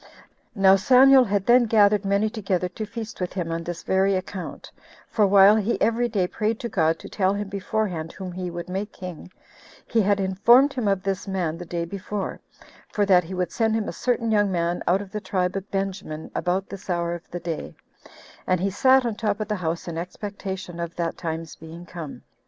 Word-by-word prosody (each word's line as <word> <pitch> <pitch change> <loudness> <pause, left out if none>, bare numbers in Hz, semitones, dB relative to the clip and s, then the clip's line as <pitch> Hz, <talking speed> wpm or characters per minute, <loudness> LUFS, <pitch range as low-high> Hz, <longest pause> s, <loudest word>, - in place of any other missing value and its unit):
Now 195 -1 +6
Samuel 260 +5 +6
had 200 -2 0
then 240 0 +5
gathered 210 -2 +4
many 200 +2 +2
together 195 -5 -1
to 215 +4 -6
feast 225 -2 -7
with 180 - -2
him 175 -3 -3
on 165 0 -3
this 170 0 -6
very 190 +1 +2
account; 185 0 -6 0.4
for 210 -3 +2
while 200 +1 +7
he 220 +2 0
every 235 +2 +1
day 200 -5 +1
prayed 215 +4 -2
to 235 - -3
God 165 -4 +1
to - - -11
tell 195 -1 0
him 205 -1 -4
beforehand 195 -4 -2
whom 185 -1 -7
he 180 0 -4
would 175 0 -6
make 195 +3 -4
king, 180 -1 -9 0.5
he 230 - +2
had 200 0 +2
informed 235 +9 +4
him 245 -5 -2
of 195 -2 +1
this 195 0 -2
man 180 -5 -1
the 175 - -8
day 170 0 -2
before, 200 +2 -5 0.5
for 205 - +1
that 185 -2 +5
he 185 +3 -6
would 180 -1 -1
send 225 -1 +1
him 220 -1 -1
a - - -4
certain 235 -2 0
young 205 -2 +3
man 170 -1 -1
out 190 +3 +2
of 195 - -14
the 210 - -4
tribe 185 -1 -1
of 195 +1 -5
Benjamin 190 -5 -4
about 185 +2 -1
this 195 0 -10
hour 170 -1 0
of 175 -1 -9
the 175 - -5
day; 170 -2 -5 0.7
and 185 -1 +2
he 195 +2 0
sat 260 +5 +4
on 235 - 0
the 210 - -12
top 210 -2 0
of 215 0 -4
the 210 - 0
house 165 +1 -3
in 165 -1 -4
expectation 190 -1 -6
of 170 -1 -4
that 170 -1 -2
time's 165 -1 -5
being 165 +2 -11
come. 165 -5 -8
195 Hz, 215 wpm, -24 LUFS, 175-210 Hz, 0.7 s, while